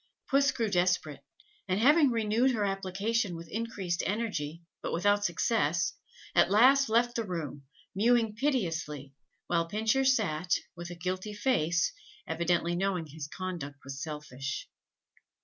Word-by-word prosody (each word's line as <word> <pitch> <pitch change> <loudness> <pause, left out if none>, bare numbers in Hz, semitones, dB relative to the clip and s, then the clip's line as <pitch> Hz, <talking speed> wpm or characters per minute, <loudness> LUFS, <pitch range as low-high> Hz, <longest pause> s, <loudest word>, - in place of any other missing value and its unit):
Puss 275 0 +4
grew 230 -2 -1
desperate, 180 -1 +1 0.4
and 185 +1 +1
having 290 +4 +6
renewed 230 +2 +2
her 210 -2 0
application 195 +1 -1
with 165 0 -8
increased 200 -5 -2
energy, 175 -7 -2 0.2
but - - -3
without 205 +4 +2
success, 175 -3 +1 0.4
at - - +5
last 260 +6 +5
left 240 +2 +2
the 230 - 0
room, 155 -7 -5 0.3
mewing 225 +2 +3
piteously, 165 - -2 0.3
while 170 -1 0
Pincher 220 +8 +1
sat, 185 -10 +2 0.2
with 175 0 -7
a 175 - -7
guilty 185 +4 -4
face, 175 -8 +1 0.3
evidently 170 +1 0
knowing 180 -2 0
his 150 0 -7
conduct 170 -5 -5
was 135 0 -7
selfish. 145 -3 -5
185 Hz, 130 wpm, -30 LUFS, 165-225 Hz, 0.4 s, having